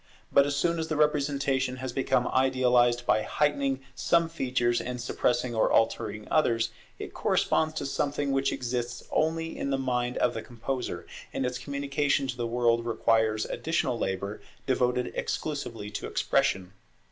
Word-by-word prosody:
But 140 0 +5
as 145 - -1
soon 170 +4 +1
as 160 - -2
the 155 - -2
representation 140 -3 +1
has 130 -1 -5
become 135 - +1
idealized 125 -2 +3
by 120 -3 +3
heightening 140 -1 0
some 170 +5 +2
features 125 -6 0
and 125 0 -4
suppressing 120 0 0
or 110 - +2
altering 105 -1 +1
others, 115 -7 +2 0.3
it - - -7
corresponds 155 0 +1
to - - -3
something 145 0 -1
which 135 0 +1
exists 120 -1 -3
only 165 +1 0
in - - -3
the 135 - +1
mind 125 -2 -1
of 120 - +2
the 115 - -4
composer; 125 +2 -4 0.3
and 135 - -2
its 125 0 -2
communication 140 +1 0
to 130 -1 -3
the 120 -1 -2
world 115 0 +2
requires 110 -2 +2
additional 155 -5 -1
labour 100 +2 -3 0.2
devoted 125 -1 +1
exclusively 115 -9 -3
to 105 - -4
Expression. 95 -1 0
125 Hz, 155 wpm, -28 LUFS, 120-140 Hz, 0.3 s, But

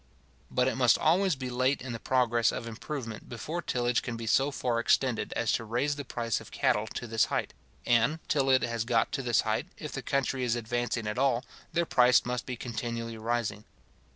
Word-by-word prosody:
But 125 0 +2
it - - +1
must 125 -2 +5
always 180 +2 +3
be 130 -1 -5
late 130 +3 +1
in 125 -2 -6
the 115 - -5
progress 120 -3 +2
of - - -5
improvement 115 -1 -6
before 155 +9 -4
tillage 120 -5 0
can 120 -3 -5
be 115 - -5
so 135 +5 +3
far 125 -4 -1
extended 120 0 +1
as 115 -2 0
to - - 0
raise 125 +6 0
the 145 - -5
price 115 -4 -2
of - - -12
cattle 105 +1 +1
to - - -4
this 115 -2 +2
height; - - -2 0.3
and, 120 +6 +3
till 135 -2 +2
it 130 -1 +4
has 115 -2 -1
got 115 -1 +1
to 135 - -2
this 120 -3 +2
height, - - -1
if - - -6
the - - -4
country 135 -1 -1
is 120 -1 +1
advancing 120 0 -2
at 105 +3 -2
all, 130 -2 +2 0.3
their 170 0 +1
price 125 -4 +4
must 125 0 -3
be 125 - -3
continually 115 -1 -4
rising. 110 -2 -2
120 Hz, 210 wpm, -29 LUFS, 115-130 Hz, 0.3 s, must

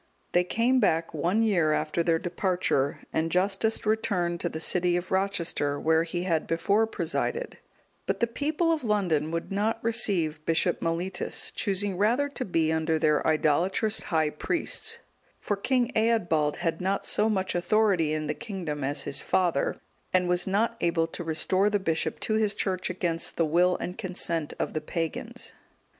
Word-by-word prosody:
They 175 - +3
came 235 +7 +2
back 165 -7 +1
one 175 +8 +1
year 170 -8 +2
after 155 +2 0
their 165 -1 +2
departure, 175 -5 -1
and 160 +1 0
Justus 195 +6 +1
returned 185 -6 0
to 175 - -1
the 160 - -5
city 175 +1 +1
of 175 +1 -5
Rochester, 180 -7 0
where 160 0 +3
he 170 +1 -3
had 165 -4 0
before 200 +7 +2
presided; 225 - -3 0.5
but - - -1
the 235 - +3
people 300 +8 0
of 320 -3 -1
London 180 -9 +1
would 165 +3 -4
not 210 +3 0
receive 185 -9 0
Bishop 165 +2 +1
Mellitus, 170 +3 -2
choosing 195 -2 0
rather 245 +8 +2
to 280 -2 -4
be 165 -6 +1
under 160 0 +1
their 150 -1 +2
idolatrous 170 +8 +2
high 160 -4 +1
priests; 440 - -2 0.4
for 205 - -1
King 250 +4 0
Eadbald 175 -10 +2
had 165 -1 -2
not 195 +2 -1
so 215 +1 +2
much 190 -3 0
authority 180 -3 +2
in 155 0 -1
the 150 - -1
kingdom 175 - -5
as 140 +1 -1
his 140 - -3
father, 175 -6 0 0.3
and 180 -1 +2
was 180 +1 +1
not 225 +4 +1
able 170 -1 +2
to 165 +1 -6
restore 185 +5 +2
the 205 - +2
bishop 165 -5 -2
to 215 - -1
his 215 -2 +1
church 185 -2 -2
against 170 -2 -3
the 165 - +3
will 175 +3 +3
and 180 - -6
consent 170 -4 -2
of - - -2
the 155 - -2
pagans. 165 +1 -4
180 Hz, 170 wpm, -27 LUFS, 160-210 Hz, 0.5 s, They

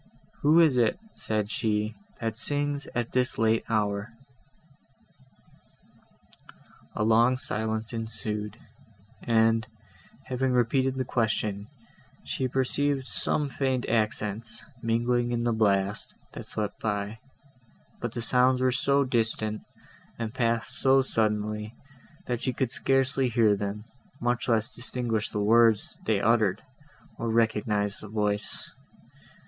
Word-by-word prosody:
"Who 155 +3 +5
is 155 -6 +5
it," 115 -3 +3 0.2
said 105 -1 -2
she, 105 -1 0 0.3
"that 115 -2 -2
sings 145 +3 0
at 120 -1 -1
this 125 0 +1
late 110 0 +2
hour?" 105 -1 0 2.8
A 105 - 0
long 115 +3 +4
silence 110 -1 -3
ensued, 110 -1 -4 0.6
and, 115 -1 +2 0.6
having 130 0 -1
repeated 130 +2 +2
the 130 -1 -2
question, 105 -4 -1 0.6
she 130 - -2
perceived 135 +2 0
some 145 +2 +1
faint 130 -2 -1
accents, 110 -1 -1 0.2
mingling 120 +1 +1
in 120 0 -1
the 120 -1 +1
blast, 100 -2 0 0.2
that - - -8
swept 105 -1 -4
by; 105 0 -2 0.8
but 120 - -3
the 120 - -3
sounds 125 +1 +3
were 130 0 +3
so 140 +2 +2
distant, 110 -4 0 0.6
and 115 -1 -4
passed 115 -3 -1
so 135 0 +4
suddenly, 105 -2 -1 0.5
that 120 -1 -2
she 130 - -1
could 125 -1 -1
scarcely 135 -1 +1
hear 110 -3 +4
them, 100 +1 -4 0.4
much 120 +1 -1
less 115 -1 +1
distinguish 120 -3 -2
the 105 - -3
words 115 0 +3
they 110 -3 +2
uttered, 110 -3 +2 0.6
or 115 - -2
recognise 105 -2 +1
the 105 - -9
voice. 105 0 -1
115 Hz, 120 wpm, -27 LUFS, 105-125 Hz, 2.8 s, Who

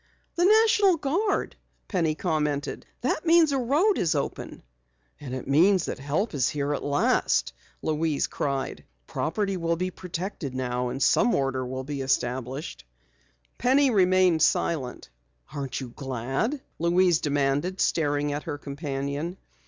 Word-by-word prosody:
"The 350 - +2
National 415 -3 +5
Guard," 360 +9 -1 0.3
Penny 165 -6 0
commented. 150 -4 -2
"That 260 +5 -1
means 330 -2 +5
a 275 - +1
road 300 - +2
is 165 -2 +1
open." 140 - -4 0.6
"And 130 -3 -6
it 130 - -6
means 175 +6 +4
that - - -5
help 150 +11 -1
is 135 -3 +1
here 145 0 -1
at - - -3
last!" 145 0 +1 0.3
Louise 155 -1 0
cried. 135 -2 -3 0.2
"Property 195 +5 -2
will 170 -1 0
be 185 +2 -2
protected 175 -6 -5
now 125 -1 -1
and 135 +2 -2
some 240 - +4
order 135 -1 0
will 130 +1 -4
be 140 0 -4
established!" 130 - -2 0.8
Penny 265 +2 +4
remained 185 -4 +4
silent. 135 - 0 0.4
"Aren't 140 -2 -4
you 130 -3 -6
glad?" 135 - -3 0.2
Louise 175 0 +3
demanded, 145 +5 0
staring 145 -2 +1
at 145 - -4
her 145 - -3
companion. 140 +3 -4
155 Hz, 135 wpm, -26 LUFS, 140-190 Hz, 0.8 s, National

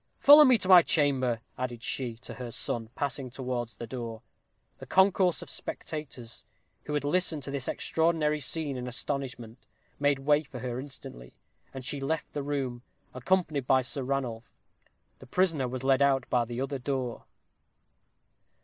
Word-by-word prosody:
Follow 295 +2 +9
me 255 -4 +6
to 185 - -3
my 185 -2 +9
chamber," 130 -8 +1 0.2
added 125 -2 -4
she 125 -4 -2
to 115 - -10
her 125 -2 -7
son, 115 -1 -4
passing 140 -2 -3
towards 125 -2 -4
the 115 - -7
door. 115 -2 -6 0.6
The - - -10
concourse 190 -2 +3
of - - -12
spectators, 135 -7 -7 0.4
who 150 - -3
had 145 - 0
listened 160 -1 0
to 140 - -5
this 140 -2 -3
extraordinary 160 -2 +1
scene 145 0 -1
in 125 0 -5
astonishment, 125 -2 -4 0.4
made 145 -1 +3
way 145 +2 +3
for 140 -4 -10
her 125 0 -4
instantly, - - -9 0.4
and 130 -2 -8
she 140 - -2
left 155 +4 -3
the 145 - -2
room, 135 -4 -3 0.3
accompanied 145 0 0
by 130 -1 +4
Ranulph. 125 -4 -3 0.7
The - - -13
prisoner 165 -4 +1
was 130 +1 -5
led 135 0 +3
out 135 -2 +3
by 120 -1 +3
the 120 +2 -5
other 135 0 -3
door. 130 -2 -3
135 Hz, 160 wpm, -29 LUFS, 125-150 Hz, 0.7 s, Follow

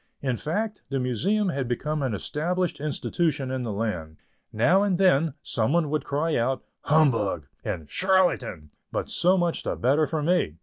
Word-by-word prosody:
In 130 -3 0
fact, 205 - -3
the 135 - -1
Museum 185 - +1
had 135 -6 -2
become 150 +5 -2
an 130 -6 -1
established 175 - -2
institution 150 -1 -1
in 130 -1 -2
the 115 -3 -3
land. 90 -8 -3 0.3
Now 165 - +4
and 200 -3 +1
then 165 -6 +3
some 115 +4 0
one 165 -4 +2
would 155 -3 -1
cry 150 +3 0
out 130 +3 0 0.2
"humbug" 125 - +2 0.2
and 80 - -4
"charlatan," 180 - +1 0.2
but - - -3
so 185 +2 +3
much 175 -2 0
the - - -2
better 145 +5 +2
for 155 -2 -2
me. 170 - +1
150 Hz, 170 wpm, -26 LUFS, 120-175 Hz, 0.3 s, Now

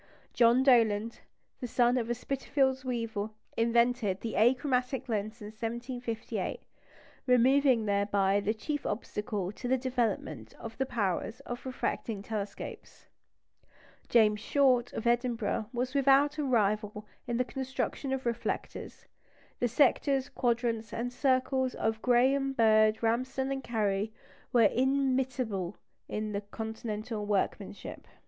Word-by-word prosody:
John 240 +2 +5
Dollond, 230 -4 +3 0.4
the 250 - -4
son 240 +1 +3
of 235 -2 -1
a 240 - 0
Spitalfields 265 +1 0
weaver, 230 -4 -2 0.3
invented 235 -3 +2
the 225 - -4
achromatic 250 +3 +2
lens 215 0 -3
in 210 - -6
1758, 235 +1 -4 0.7
removing 255 -1 +4
thereby 200 -1 +2
the 205 +2 -1
chief 290 +6 -3
obstacle 210 -3 -3
to 245 - -7
the 260 +1 +3
development 230 - -2
of 225 -1 -9
the 265 - 0
powers 220 0 -2
of 245 -3 -7
refracting 225 -5 -3
telescopes; 210 -2 -6 1.0
James 215 -3 +4
Short, 250 0 +2
of 225 - -5
Edinburgh, 235 -3 0
was 250 +1 -2
without 280 +2 +4
a - - +1
rival 215 -4 0 0.2
in 235 - -1
the 250 - +1
construction 265 +1 -3
of 265 -1 -2
reflectors; 235 0 -4 0.5
the 245 - +2
sectors, 270 +2 +2
quadrants, 235 -4 -1
and 245 +2 -3
circles 260 0 +1
of 220 0 -1
Graham, 270 +2 +3
Bird, 215 -2 +4
Ramsden, 260 +4 0
and 270 -1 -3
Cary 210 -2 -1 0.4
were 240 -2 +5
inimitable 255 -6 +1 0.3
by 210 -1 -3
Continental 220 0 -4
workmanship. 205 -2 -3
235 Hz, 120 wpm, -30 LUFS, 215-260 Hz, 1.0 s, John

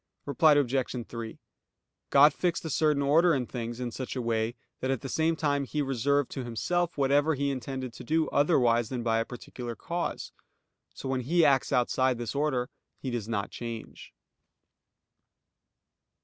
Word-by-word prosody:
Reply 150 +2 +4
Obj. 130 -3 0
3: 115 -1 -7 0.7
God 145 +1 +7
fixed 175 0 -1
a 160 - -3
certain 150 -1 +2
order 165 +4 +4
in 130 -2 -1
things 120 -1 -5
in 125 -1 -3
such 130 +2 -5
a 130 - -2
way 115 0 0 0.2
that 130 - -2
at 135 -3 0
the - - -5
same 160 +4 +1
time 145 -3 0
He 145 +2 -2
reserved 140 +1 +1
to 135 - -4
Himself 170 +9 -1
whatever 145 +3 +3
he 140 +1 0
intended 130 -1 -5
to - - -10
do 160 0 +1
otherwise 120 -7 +3
than 125 -3 -3
by 115 -1 +2
a 115 - 0
particular 120 -1 -7
cause. 175 +7 -4 0.6
So - - -6
when 130 -1 0
He 165 +6 +3
acts 135 -2 +3
outside 125 +1 +2
this 120 -1 -4
order, 140 -4 0 0.3
He 130 - -5
does 115 -3 -4
not 105 -3 -2
change. 115 -2 -7
135 Hz, 165 wpm, -28 LUFS, 120-145 Hz, 0.7 s, God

